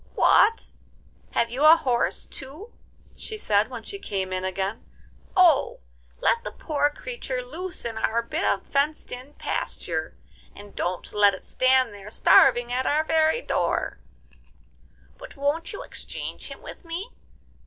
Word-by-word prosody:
'What! 450 +2 +4 0.6
have 230 - +1
you 260 +4 -1
a 310 +1 +10
horse 250 -7 0
too?' 300 - -10 0.4
she 435 - -5
said 210 - +2
when 245 -3 -7
she 400 - -6
came 190 - -3
in 185 0 -2
again. 190 +3 -3 0.5
'Oh! 335 -7 +4 0.4
let 465 - +2
the - - -4
poor 290 -2 0
creature 295 - -5
loose 345 +6 -5
in 225 -1 -3
our 235 +1 +1
bit 315 +9 -3
of - - +1
fenced 285 +2 -1
in 255 +4 -9
pasture, 165 - -3 0.4
and 205 0 -13
don't 180 0 -3
let 205 -1 +5
it - - -13
stand 255 -3 +3
there 205 0 -10
starving 240 +2 +5
at 260 +1 0
our 305 +2 +2
very 320 +8 +2
door. - - -1 1.2
But - - -11
won't 285 +4 -1
you 405 - -6
exchange - - -6
him - - -10
with - - -10
me? 350 +8 -6
265 Hz, 150 wpm, -25 LUFS, 220-330 Hz, 1.2 s, a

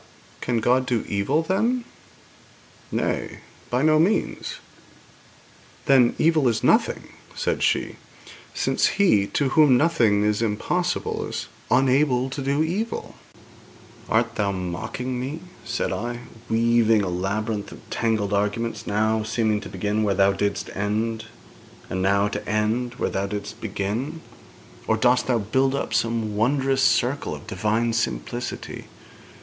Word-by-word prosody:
'But - - -26
can 120 -2 0
God 125 +3 +2
do 120 -3 0
evil, 115 +11 +1
then?' 230 +8 0 1.1
'Nay; - - -2 0.3
by 125 +3 +1
no 155 0 +5
means.' 185 +7 0 1.3
'Then, 130 -3 +5
evil 155 -4 +3
is 115 -2 0
nothing,' - - +2 0.3
said - - -1
she, - - 0 0.5
'since - - +1
He 105 - +4
to 140 +4 0
whom 140 -3 +5
nothing 120 -10 +3
is 105 +1 +1
impossible 175 +12 -1
is - - -5 0.2
unable 130 0 +3
to 140 - -4
do 140 +3 +1
evil.' 200 +8 -3 1.0
'Art 115 +1 +2
thou 100 -2 +1
mocking 110 +7 -4
me,' 140 +6 -4 0.2
said - - -2
I, 120 +5 -4 0.3
'weaving 115 -1 +3
a - - -2
labyrinth 100 +3 -2
of - - -13
tangled 110 -3 0
arguments, 105 +3 -1
now 110 +2 +1
seeming 110 -1 0
to 100 - -8
begin 105 +3 -1
where 100 -2 +1
thou 100 +1 +4
didst 100 +1 -2
end, 110 +3 -1 0.7
and 95 +1 -1
now 100 +2 +3
to - - -5
end 115 +3 0
where - - -2
thou 95 +1 -1
didst 105 +2 -6
begin, 110 +9 -3 0.7
or 110 - +2
dost 125 +2 +3
thou 125 -2 +2
build 130 +6 +1
up - - -3
some 115 -2 0
wondrous 135 +4 +1
circle 130 +2 +1
of - - -11
Divine 110 +1 0
simplicity? 120 +1 -3
115 Hz, 135 wpm, -24 LUFS, 105-130 Hz, 1.3 s, no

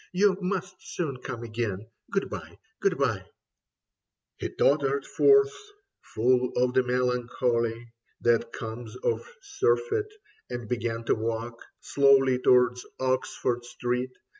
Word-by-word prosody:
You 195 +1 +4
must 185 0 -3
soon 150 -7 -4
come 125 -1 -6
again. 110 -3 -3 0.2
Good 195 - 0
bye, - - -8 0.2
good 195 -2 +1
bye.... 115 -9 0 1.1
He - - -3
tottered 140 -1 +2
forth, 415 0 +4 0.5
full 125 +2 +1
of 125 0 +2
the 130 - +5
melancholy 120 -2 -1 0.3
That 115 -1 +2
comes 115 +1 -7
of 475 +1 -2
surfeit, 440 -1 0 0.4
and 120 -2 -5
began 115 -1 -2
to - - +2
walk 115 +1 -3 0.2
Slowly 135 -2 +4
towards 125 -1 +4 0.2
Oxford 130 -1 -1
Street. 125 +1 -2
125 Hz, 115 wpm, -27 LUFS, 120-140 Hz, 1.1 s, the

